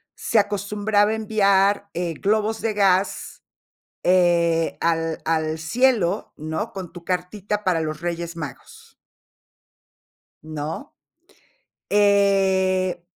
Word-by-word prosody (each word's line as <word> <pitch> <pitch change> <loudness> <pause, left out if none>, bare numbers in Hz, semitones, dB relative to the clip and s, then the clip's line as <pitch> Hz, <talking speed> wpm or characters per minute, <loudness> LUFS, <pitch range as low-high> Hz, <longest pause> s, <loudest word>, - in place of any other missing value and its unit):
se 225 - +1
acostumbraba 205 +1 +1
enviar, 200 -2 +2
eh, 175 -1 -2
globos 215 +4 0
de 225 -1 -1
gas, 195 -1 0 0.6
eh, 170 -2 +3
al 165 -1 0
al 160 -1 0
cielo, 210 +1 +1
¿no?, 160 +8 -4
con 185 -3 -7
tu 175 -1 -11
cartita 195 +4 -3
para 180 -3 +1
los 155 -1 -4
Reyes 170 0 -4
Magos 150 -6 -9 1.5
¿no? 155 - -6 1.0
Eh, 190 -3 +2
185 Hz, 95 wpm, -22 LUFS, 170-205 Hz, 1.5 s, eh